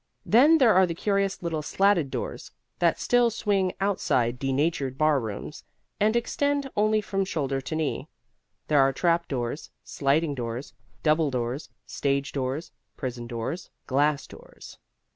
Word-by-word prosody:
Then 290 +9 +6
there 245 -7 +5
are 185 0 +5
the 170 - -4
curious 195 0 0
little 165 -2 -2
slatted 185 -2 +2
doors - - -5 0.3
that - - +2
still 245 -1 +3
swing 200 -4 0
outside 125 -11 +1
denatured 135 0 0
bar 155 -1 +3
rooms 110 -4 -6 0.4
and 215 +2 +3
extend 285 +4 0
only 215 +1 +2
from 195 -1 -1
shoulder 140 -7 -2
to 155 - -5
knee. 155 -2 -2 0.6
There 150 -2 +3
are 135 0 +3
trapdoors, 155 -5 -1
sliding 145 +2 0
doors, 120 0 -5 0.3
double 155 -1 +3
doors, 125 +2 -3 0.2
stage 140 0 -1
doors, 135 +3 -3 0.3
prison 120 -3 -5
doors, 120 +9 -4 0.2
glass 145 +2 +1
doors. - - -14
155 Hz, 140 wpm, -26 LUFS, 135-195 Hz, 0.6 s, Then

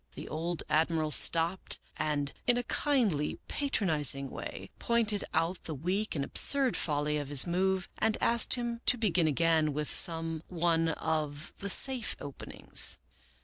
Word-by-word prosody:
The - - -8
old 165 +1 -4
Admiral 155 0 0
stopped 165 +5 +3 0.2
and, 150 -2 -3
in 245 -1 +3
a 245 - -2
kindly 225 - 0
patronizing 155 - 0
way, - - -8
pointed 220 -3 0
out 165 +3 -2
the 160 - -6
weak 185 +9 -3
and 140 -2 -2
absurd 275 - +4
folly 150 -1 -1
of 145 -2 -5
his 140 -2 +1
move 185 +1 -1
and 220 0 0
asked 235 +1 +3
him 240 -1 -5
to 245 - +3
begin 180 -7 +1
again 160 0 +1
with 150 +1 -3
some 165 -1 +2
one 165 -2 0
of 155 -1 -4
the 200 - -5
safe 255 +3 +3
openings. 140 -1 +1
165 Hz, 145 wpm, -29 LUFS, 150-210 Hz, 0.2 s, absurd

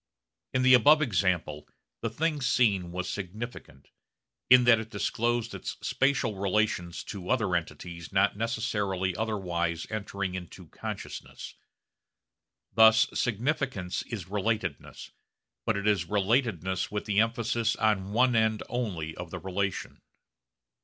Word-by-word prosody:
In 130 0 +1
the 130 0 +7
above 145 +5 +7
example 90 - 0 0.3
the 115 - -1
thing 150 +5 -1
seen 100 -9 +2
was 90 +1 -3
significant, 100 - -7 0.6
in 125 0 +8
that 120 -2 +6
it 110 0 -6
disclosed 120 0 -1
its - - -6
spatial 135 -6 +1
relations 100 -3 0
to 95 -3 -7
other 110 -8 +1
entities 85 0 -5
not 100 +1 +3
necessarily 105 -5 -1
otherwise 90 -6 -2
entering 100 -3 -3
into 90 -2 -8
consciousness. - - -7 1.2
Thus 110 +2 +6
significance 120 -5 -1
is 110 -8 -6
relatedness, 105 +3 -3 0.6
but 110 -3 +2
it 100 - -3
is 100 -5 +2
relatedness 100 - 0
with 105 0 -4
the 100 -1 +1
emphasis 115 0 +1
on 100 -3 +1
one 125 +2 +3
end 110 -1 +2
only 90 -11 -3
of 90 -1 -7
the 90 - -6
relation. 95 +2 -3
105 Hz, 125 wpm, -28 LUFS, 90-115 Hz, 1.2 s, in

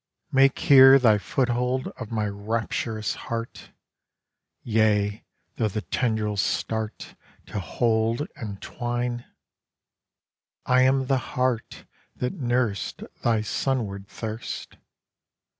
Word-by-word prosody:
Make 135 0 +4
here 135 -1 +8
thy 110 -5 +4
foothold 125 +3 0
of 115 -4 -9
my 110 -2 -1
rapturous 110 +1 -2
heart, 115 0 -6 0.9
Yea, 105 -2 +1 0.3
though 110 - +1
the 105 +1 -4
tendrils 110 -4 0
start 110 -1 -3 0.3
To 105 - -5
hold 115 - 0
and 100 -3 -7
twine! 120 0 -3 1.4
I 125 0 +4
am 130 +1 +3
the 130 0 +2 0.2
heart 125 -3 -1 0.3
that 125 - -2
nursed 120 - -1 0.2
Thy 115 -2 +2
sunward 110 -5 -2
thirst. 110 +2 -6
115 Hz, 100 wpm, -25 LUFS, 110-125 Hz, 1.4 s, here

